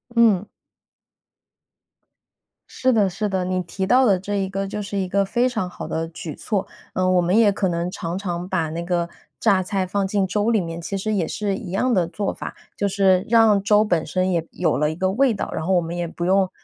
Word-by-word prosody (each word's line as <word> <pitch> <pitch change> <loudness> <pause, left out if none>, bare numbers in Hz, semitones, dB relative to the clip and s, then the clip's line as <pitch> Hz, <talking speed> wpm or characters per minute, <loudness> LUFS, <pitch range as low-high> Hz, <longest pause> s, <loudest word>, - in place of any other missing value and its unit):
嗯。 215 -4 +4 2.2
是 260 - +1
的 210 -5 +3
是 205 +3 -2
的， 190 -2 -1
你 185 0 -1
提 190 +3 -4
到 255 +5 +5
的 195 -5 +3
这 205 +2 -4
一 195 -1 -1
个 195 0 -3
就 210 +2 -4
是 200 0 -4
一 190 -1 -1
个 200 +2 +2
非 240 +5 +1
常 220 -8 -2
好 - - -7
的 165 - -2
举 165 -2 -7
措。 200 -3 -2 0.3
嗯， 185 0 +1
我 180 - +4
们 180 +4 +2
也 225 -2 +6
可 195 -1 0
能 170 0 -1
常 170 -1 -4
常 180 -2 -4
把 165 -5 0
那 170 +2 -4
个 170 -1 0 0.3
榨 195 -4 +3
菜 190 0 -1
放 195 +2 -1
进 195 0 0
粥 210 +4 +1
里 220 - +3
面， 165 -2 -5
其 195 +4 -3
实 215 +3 -2
也 190 -5 +1
是 200 +3 -2
一 190 -2 -7
样 245 +6 +1
的 180 -5 +3
做 200 +3 -3
法， - - -7 0.2
就 - - -1
是 190 -1 +3
让 220 -3 +5
粥 210 +1 +4
本 175 -6 +1
身 185 0 0
也 165 -2 0
有 165 -4 0
了 150 +1 +1
一 - - -6
个 185 +2 0
味 255 +4 +3
道。 200 - -4
然 160 - -3
后 190 - +1
我 175 - +4
们 165 +1 -5
也 175 0 -2
不 170 +1 -5
用 190 +1 +3
190 Hz, 250 characters per minute, -22 LUFS, 175-205 Hz, 2.2 s, 也